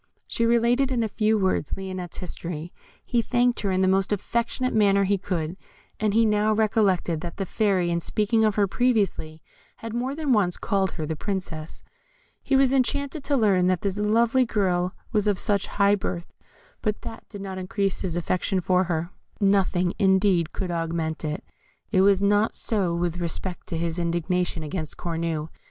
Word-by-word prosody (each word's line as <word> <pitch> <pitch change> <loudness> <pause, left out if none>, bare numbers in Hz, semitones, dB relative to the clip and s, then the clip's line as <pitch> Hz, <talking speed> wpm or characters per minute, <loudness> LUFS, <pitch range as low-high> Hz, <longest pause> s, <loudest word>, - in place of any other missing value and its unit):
She 230 - 0
related 240 +3 +3
in 240 -3 +1
a - - 0
few 215 +1 +1
words 190 -7 0
Lionette's 185 -2 -6
history. 170 -2 -6 0.3
He 240 -2 +1
thanked 245 +1 +1
her 200 - -1
in 185 0 +1
the 190 - +3
most 190 +1 +2
affectionate 235 +5 -1
manner 200 -2 +4
he 195 0 +1
could, 175 -2 -3 0.4
and 215 -1 +1
he 230 0 +5
now 210 0 +2
recollected 200 -6 +1
that 170 - -6
the 195 - -2
Fairy, 190 -4 +1
in 170 - +1
speaking 215 +5 +1
of 215 -2 +2
her 205 - +3
previously, 195 -9 0 0.3
had 225 -1 -7
more 250 +4 -2
than 300 -4 +1
once 190 -5 +2
called 195 -3 0
her 155 - -4
the 160 +1 -3
Princess. 165 -4 -5 0.6
He - - 0
was 270 -1 +4
enchanted 280 +3 0
to 285 -1 +2
learn 195 -6 +3
that 185 -1 +1
this 200 0 -2
lovely 230 +4 +3
girl 185 -5 0 0.2
was 210 -2 +1
of 205 -2 +2
such 205 -1 +1
high 200 0 +3
birth, 180 -3 -3 0.5
but 215 -1 -2
that 225 - -9
did 205 -2 -8
not 190 -1 -5
increase 195 0 -1
his 180 -4 -2
affection 185 +3 0
for 185 +1 +2
her. 170 0 -2 0.3
Nothing, 195 -3 +2
indeed, 190 -4 +3
could 185 -3 -4
augment 165 -1 -2
it. 150 -1 -3 0.5
It 190 -3 +4
was 200 0 +4
not 205 +2 +2
so 190 -6 0
with 175 0 -1
respect 175 +1 -3
to 165 - -3
his 165 +1 -2
indignation 170 0 -1
against 155 0 -4
Cornue. 165 -2 -3
195 Hz, 180 wpm, -25 LUFS, 175-215 Hz, 0.6 s, he